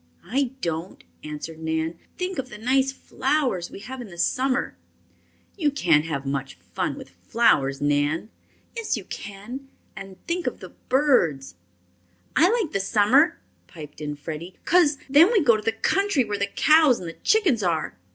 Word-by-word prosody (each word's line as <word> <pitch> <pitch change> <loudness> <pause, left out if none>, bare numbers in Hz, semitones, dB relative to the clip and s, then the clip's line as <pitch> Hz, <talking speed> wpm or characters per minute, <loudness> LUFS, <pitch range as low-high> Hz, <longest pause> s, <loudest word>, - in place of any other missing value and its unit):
"I 270 +1 0
don't," 165 +2 -4 0.2
answered 155 +1 -7
Nan. 160 +1 -2 0.2
"Think 365 -2 -3
of 260 -1 -4
the 210 - -9
nice 265 +4 +2
flowers 265 - -1
we - - -10
have 255 +4 -7
in 240 - -8
the 175 -3 -12
summer." 260 +9 0 0.8
"You 315 -7 +1
can't 170 - +2
have 140 -4 -4
much 135 0 -3
fun - - -4
with - - -11
flowers, 135 - +1
Nan." 145 +7 0 0.4
"Yes, 455 - -2
you 210 - -6
can. 210 +9 -8 0.3
And 195 -2 -9
think 350 +1 -2
of - - -3
the - - -10 0.2
birds 215 - +2 0.4
" 90 0 -38
"I 345 +4 +5
like 440 -8 0
the 195 - +1
summer," 215 - +3 0.3
piped 150 -2 -11
in 150 -1 -4
Freddie, 160 +4 -7
"cos 320 -5 +4
then 300 - +6
we 450 - +4
go 235 -6 +5
to 215 - -3
the 225 +1 0
country 390 - +1
where 205 -2 -4
the 200 - 0
cows 305 +3 +4
and 175 - -7
the 165 - -6
chickens 365 - +2
are!" 165 - -1
210 Hz, 170 wpm, -24 LUFS, -, 0.8 s, then